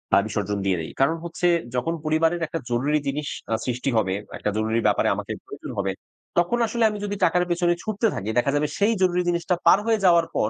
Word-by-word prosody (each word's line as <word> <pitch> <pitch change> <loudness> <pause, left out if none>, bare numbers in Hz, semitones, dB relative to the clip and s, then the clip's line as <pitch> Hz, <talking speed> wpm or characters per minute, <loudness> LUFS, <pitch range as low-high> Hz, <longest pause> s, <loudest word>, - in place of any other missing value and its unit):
আ - - +7
বিসর্জন 105 -1 -2
দিয়ে 95 -2 +2
দেই। 80 - -7
কারণ 140 +5 +3
হচ্ছে 170 +1 -1 0.3
যখন 125 +7 0
পরিবারের 165 +2 +2
একটা 165 - -4
জরুরি 140 +6 +1
জিনিস 145 +2 -2 0.3
আ - - +4
সৃষ্টি 125 +1 -1
হবে, 95 -4 +1 0.2
একটা - - -2
জরুরি 110 +1 +1
ব্যাপারে - - +2
আমাকে - - -5
প্রয়োজন - - -9
হবে, 100 -1 0 0.5
তখন 175 +7 +2
আসলে 235 +1 -1
আমি 210 - -5
যদি 205 0 -3
টাকার 180 +1 +2
পেছনে 175 0 +2
ছুটতে 215 +1 0
থাকি 100 - -4
দেখা 130 +3 +3
যাবে 150 +1 +1
সেই 210 +3 +3
জরুরি 180 -1 +3
জিনিসটা 175 +1 0
পার - - +7
হয়ে 225 -1 +3
যাওয়ার 170 -2 +5
পর 105 - +1
160 Hz, 210 wpm, -24 LUFS, 120-180 Hz, 0.5 s, আ